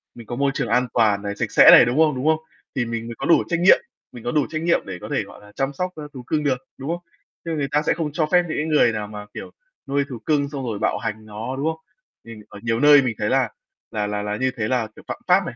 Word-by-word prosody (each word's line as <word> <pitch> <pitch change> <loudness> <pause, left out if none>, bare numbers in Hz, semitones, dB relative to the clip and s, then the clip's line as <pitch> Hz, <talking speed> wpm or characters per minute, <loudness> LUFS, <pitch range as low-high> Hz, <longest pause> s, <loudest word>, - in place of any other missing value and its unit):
mình 115 -2 -12
có 120 - -4
môi 140 +2 +1
trường - - -2
an 125 0 +2
toàn 105 -4 +3
này, 100 0 -4
sạch - - -3
sẽ - - +8
này, - - +9
đúng 120 +4 -1
không? 155 -4 +4
Đúng 130 - -4
không? 160 0 +3 0.4
Thì 130 - 0
mình 115 0 -4
mới 115 - -7
có - - -4
đủ 170 - +4
trách 170 -2 -1
nhiệm 180 +3 +6 0.3
mình 120 - -10
có 120 - -2
đủ 150 0 +2
trách 155 -1 -3
nhiệm 170 +1 +2
để 95 -2 -6
có - - -8
thể, - - 0
gọi - - -14
là, 105 0 -16
chăm 135 +1 -1
sóc, 180 +5 -3
a, 155 - -7
thú 130 -2 -9
cưng 150 -1 0
được, 135 -3 +1 0.2
đúng 135 +2 -6
không? 170 +1 -2 0.5
Chứ 165 - -3
người 145 -2 -1
ta 150 - +2
sẽ - - +4
không 155 -2 -3
cho 155 0 +1
phép 180 0 +5
những - - -3
cái 150 - -1
người 150 -6 +4
nào 105 -1 -4
mà, 105 0 -8
kiểu, - - -8 0.4
nuôi 140 +1 +1
thú 125 -4 -7
cưng 145 -2 +1
xong 140 -2 -5
rồi 110 -4 -3
bạo - - 0
hành 110 -1 -5
nó, 110 +4 -6
đúng 140 - -2
không? 160 0 -2 0.4
Mình 115 -2 -11
ở 100 - -11
nhiều 115 0 0
nơi 145 0 +7
mình 125 -4 -2
thấy 105 - 0
là 130 -3 +2 0.4
là 105 -1 -2
là 105 0 -2
là 105 0 -3
như 130 +3 0
thế 105 -2 -1
là, 120 -2 0
kiểu, - - -14
phạm - - -4
pháp 185 +1 +4
này, 130 - -6
130 Hz, 305 wpm, -22 LUFS, 110-150 Hz, 0.5 s, này